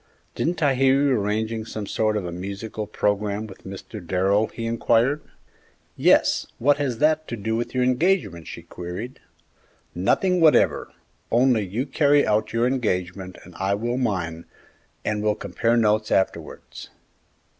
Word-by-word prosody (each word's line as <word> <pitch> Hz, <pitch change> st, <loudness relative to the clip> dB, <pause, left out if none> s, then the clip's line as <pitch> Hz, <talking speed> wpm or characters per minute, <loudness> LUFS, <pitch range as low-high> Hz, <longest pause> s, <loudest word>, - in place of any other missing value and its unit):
"Didn't 165 Hz, -1 st, -1 dB
I 140 Hz, -2 st, +4 dB
hear 135 Hz, +1 st, +3 dB
you 140 Hz, -1 st, +2 dB
arranging 110 Hz, 0 st, -1 dB
some 110 Hz, -1 st, -6 dB
sort 110 Hz, +1 st, 0 dB
of 100 Hz, -, -3 dB
a 85 Hz, -, -4 dB
musical 100 Hz, +4 st, -5 dB
programme 105 Hz, +1 st, -1 dB
with 100 Hz, -3 st, -13 dB
Mr. 95 Hz, +1 st, -8 dB
Darrell?" 95 Hz, +5 st, +1 dB
he 115 Hz, -, -7 dB
inquired. 115 Hz, +5 st, +2 dB, 0.7 s
"Yes; -, -, +3 dB
what 145 Hz, +4 st, +3 dB
has 135 Hz, -5 st, -2 dB
that 155 Hz, +3 st, +2 dB
to 120 Hz, -, -5 dB
do 110 Hz, +2 st, -2 dB
with 120 Hz, +2 st, -3 dB
your 125 Hz, -, +2 dB
engagement?" 125 Hz, -, +1 dB
she -, -, -8 dB
queried. 90 Hz, +9 st, -7 dB, 0.7 s
"Nothing 180 Hz, -, +1 dB
whatever; 155 Hz, -2 st, +4 dB, 0.4 s
only 120 Hz, -2 st, +3 dB
you 105 Hz, +8 st, -3 dB
carry 145 Hz, +1 st, +3 dB
out 110 Hz, +1 st, +1 dB
your 115 Hz, +1 st, +1 dB
engagement 95 Hz, -7 st, -2 dB
and 90 Hz, -, -14 dB
I 95 Hz, +1 st, +1 dB
will 120 Hz, +4 st, -2 dB
mine, 85 Hz, -9 st, -2 dB, 0.6 s
and 105 Hz, -1 st, -1 dB
we'll 105 Hz, 0 st, +1 dB
compare 115 Hz, +4 st, 0 dB
notes 110 Hz, -1 st, +2 dB
afterwards." 95 Hz, -, -2 dB
110 Hz, 150 wpm, -23 LUFS, 100-130 Hz, 0.7 s, I